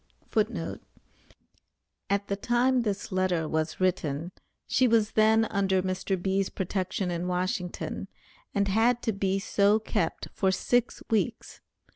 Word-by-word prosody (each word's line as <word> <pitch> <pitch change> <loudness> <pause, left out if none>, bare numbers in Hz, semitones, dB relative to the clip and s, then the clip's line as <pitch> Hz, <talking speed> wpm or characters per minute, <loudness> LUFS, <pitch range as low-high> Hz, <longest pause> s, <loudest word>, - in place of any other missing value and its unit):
[Footnote 215 -6 -1 1.3
A: - - +2
At 200 0 0
the 200 - -1
time 245 +4 +2
this 205 -3 -3
letter 185 -4 +1
was 160 0 -2
written, 175 -3 0 0.3
she 255 - +3
was 225 -2 +3
then 220 +1 +4
under 190 -3 +1
Mr. 190 0 -1
B.'s 190 +1 0
protection 185 0 -2
in 175 +1 -2
Washington, 180 0 -2 0.4
and 200 0 +1
had 225 +5 +2
to 225 - +1
be 195 -1 0
so 200 +1 +3
kept 180 -6 -2
for 190 -1 +2
six 245 +5 0
weeks. 225 +1 -1
195 Hz, 135 wpm, -28 LUFS, 185-220 Hz, 1.3 s, then